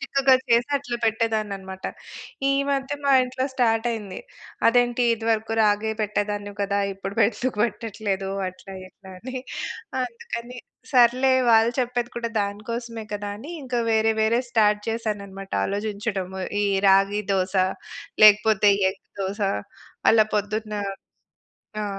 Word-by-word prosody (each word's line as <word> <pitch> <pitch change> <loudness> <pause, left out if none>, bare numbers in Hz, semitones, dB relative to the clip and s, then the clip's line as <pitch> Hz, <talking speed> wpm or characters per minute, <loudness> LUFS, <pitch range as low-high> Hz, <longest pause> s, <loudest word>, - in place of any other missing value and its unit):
చిక్కగా 270 -1 +3
చేసి 235 +3 +3
అట్లా 245 -3 -4
పెట్టేదాన్ని 220 -2 0
అన్నమాట. 190 0 -10 0.6
ఈ - - +3 0.2
మధ్య 275 0 -1
మా 280 - +4
ఇంట్లో 255 +1 -3
స్టార్ట్ 235 -3 +1
అయింది. 210 -5 -5 0.5
అదేంటి 245 +1 +3
ఇదివరకు 225 0 -1
రాగే 210 +1 +2
పెట్టేదానివి 205 -1 -2
కదా! 200 0 0
ఇప్పుడు 195 +1 -7
ఎందుకు 240 +1 -3
పెట్టట్లేదు? 205 -3 -3 0.2
అట్లా 190 +1 -12
ఇట్లా 190 0 -16
అని. 255 +5 -7 0.7
అందుకని 240 0 -6 0.4
సర్లే 255 +1 +5 0.2
వాళ్ళు 225 +1 +5
చెప్పేది 245 0 -2
కూడా 235 -1 -2
దాని 200 +1 -3
కోసమే 230 -1 -5
కదా! 205 0 -4
అని 275 +9 -9
ఇంక 255 -2 -6 0.2
వేరే 220 0 +3
వేరే 230 +3 +2
స్టార్ట్ 210 -2 +3
చేశానన్నమాట. 200 -4 -4
ఆలోచించడము 200 -2 -3 0.2
ఈ - - +2 0.2
రాగి 195 +2 +4
దోస, 190 0 0 0.7
లేకపోతే 210 -1 +6 0.2
ఎగ్ 195 - -14 0.2
దోస 195 +3 -3 0.7
అలా 220 -1 +5
పొద్దున్న. 210 +1 -2 1.1
ఆ! - - -2
220 Hz, 125 wpm, -24 LUFS, 205-235 Hz, 1.1 s, లేకపోతే